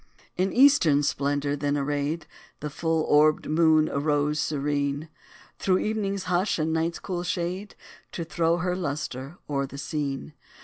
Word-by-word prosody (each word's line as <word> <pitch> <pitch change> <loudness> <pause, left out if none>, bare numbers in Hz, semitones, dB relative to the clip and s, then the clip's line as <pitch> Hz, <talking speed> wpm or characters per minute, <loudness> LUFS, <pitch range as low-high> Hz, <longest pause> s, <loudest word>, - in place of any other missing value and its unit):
In 185 +2 0
eastern 240 - +5
splendor, 145 0 0
then 145 0 -1
arrayed, 145 +3 -1 0.3
The 150 0 -5
full 160 +1 0
orbed 155 +1 +4
moon 155 0 +4
arose 145 +1 0
serene, 145 0 -1 0.5
Through 185 -1 +2
evening's 200 -2 -1
hush 180 +2 +1
and 160 0 0
night's 165 +1 0
cool 180 -3 -4
shade 180 +3 -3 0.4
To 170 - -3
throw 165 0 +1
her 180 +1 -1
lustre 145 -3 -4
o'er 140 -2 -1
the 140 - -10
scene. 145 -1 -3
155 Hz, 140 wpm, -26 LUFS, 145-175 Hz, 0.5 s, eastern